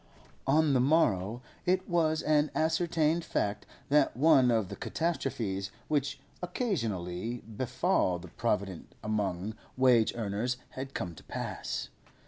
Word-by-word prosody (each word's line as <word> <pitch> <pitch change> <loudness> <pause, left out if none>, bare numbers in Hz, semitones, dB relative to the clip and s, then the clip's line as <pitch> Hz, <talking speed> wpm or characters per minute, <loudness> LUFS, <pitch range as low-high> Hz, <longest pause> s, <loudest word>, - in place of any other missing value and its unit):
On 150 +1 +4
the 130 - +4
morrow 120 - +2 0.2
it 185 +1 +2
was 160 -3 +2
an 150 0 +3
ascertained 160 0 +2
fact 105 -10 -1 0.2
that 145 -4 +3
one 135 -3 +6
of 110 -5 +2
the 100 - -5
catastrophes 115 - -2 0.2
which 140 -2 0 0.2
occasionally 115 - -2
befall 125 - 0
the 90 0 -10
provident 100 -4 -2
among 105 -2 -1 0.2
wage 125 -4 +4
earners 115 +2 -1
had 135 +1 -7
come 85 -2 -3
to - - -14
pass. - - -4
125 Hz, 120 wpm, -30 LUFS, 105-155 Hz, 0.2 s, one